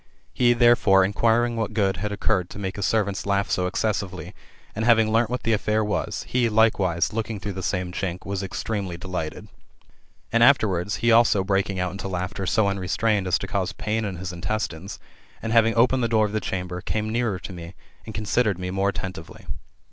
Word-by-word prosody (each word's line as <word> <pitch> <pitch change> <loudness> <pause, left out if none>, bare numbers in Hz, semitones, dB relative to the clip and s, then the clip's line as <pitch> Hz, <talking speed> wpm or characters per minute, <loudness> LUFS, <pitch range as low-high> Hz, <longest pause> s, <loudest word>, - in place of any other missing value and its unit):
He, 120 -1 +4
therefore, 120 -5 +5
inquiring 115 +4 +1
what 110 -1 -2
good 95 -4 +1
had 105 +3 -3
occurred 100 -3 0
to - - -9
make 95 0 -4
his 100 - 0
servants 105 -1 0
laugh 100 0 0
so 90 0 +1
excessively, 95 -4 -2 0.4
and 110 - -2
having 115 -2 +4
learnt 115 0 +2
what 125 0 -3
the 115 - +1
affair 110 0 +1
was, 105 0 -2
he, 120 -2 +1
likewise, 105 -6 +2
looking 110 -1 -3
through 100 +1 -5
the 95 - -5
same 90 -1 -2
chink, 90 -1 -4
was 100 0 -3
extremely 95 -2 -4
delighted. 85 -3 -5 0.8
And 115 0 +2
afterwards, 105 -7 +3
he 120 - +5
also 115 -4 +5
breaking 95 0 0
out 90 -1 -1
into 100 +1 -6
laughter 90 +1 -3
so 110 +1 +2
unrestrained 100 +1 0
as 90 - +3
to - - -6
cause 95 -2 -2
pain 110 +1 -2
in 100 -3 -3
his 90 0 -6
intestines, 95 0 -4 0.4
and 115 0 -3
having 115 -1 +4
opened 125 +2 +3
the - - +2
door 110 -1 +3
of 105 - -4
the 110 - 0
chamber, 90 -1 -4
came 110 +2 -2
nearer 115 -4 0
to 95 - -9
me, 85 +1 -9 0.3
and 110 - -9
considered 105 -2 +1
me 90 0 -4
more 95 +1 +1
attentively. 95 -3 -7
100 Hz, 195 wpm, -24 LUFS, 95-110 Hz, 0.8 s, therefore